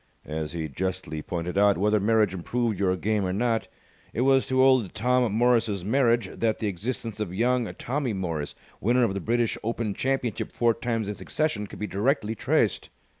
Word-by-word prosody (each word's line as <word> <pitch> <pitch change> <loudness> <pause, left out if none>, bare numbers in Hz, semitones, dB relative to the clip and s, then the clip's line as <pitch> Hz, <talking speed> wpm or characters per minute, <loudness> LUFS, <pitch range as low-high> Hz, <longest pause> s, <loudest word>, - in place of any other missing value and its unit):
As 75 0 -4
he 80 -2 -3
justly 90 0 -4
pointed 90 +3 -3
out, 100 -1 +4
whether 105 +3 +2
marriage 105 -1 +2
improved 110 +3 -1
your 95 -2 +2
game 105 +1 0
or 90 - -1
not, 115 +3 0 0.5
it - - -1
was 135 0 +4
to 130 0 +3
Old 130 -7 +3
Tom 125 0 +2
Morris's 110 -4 +2
marriage 120 -2 +2
that 110 -2 +1
the - - -4
existence 110 +3 -4
of 105 -5 -3
young 120 +1 +1
Tommy 130 -2 -2
Morris, 85 -6 -3 0.2
winner 120 +4 +3
of 110 -5 +1
the 100 - -2
British 115 +4 0
Open 115 -2 -2
Championship 130 -2 -2
four 120 -1 +2
times 115 -2 -2
in 105 - -2
succession, 105 -3 -2
could - - -10
be 105 - -3
directly 110 +2 0
traced. 115 - 0
110 Hz, 180 wpm, -26 LUFS, 95-120 Hz, 0.5 s, out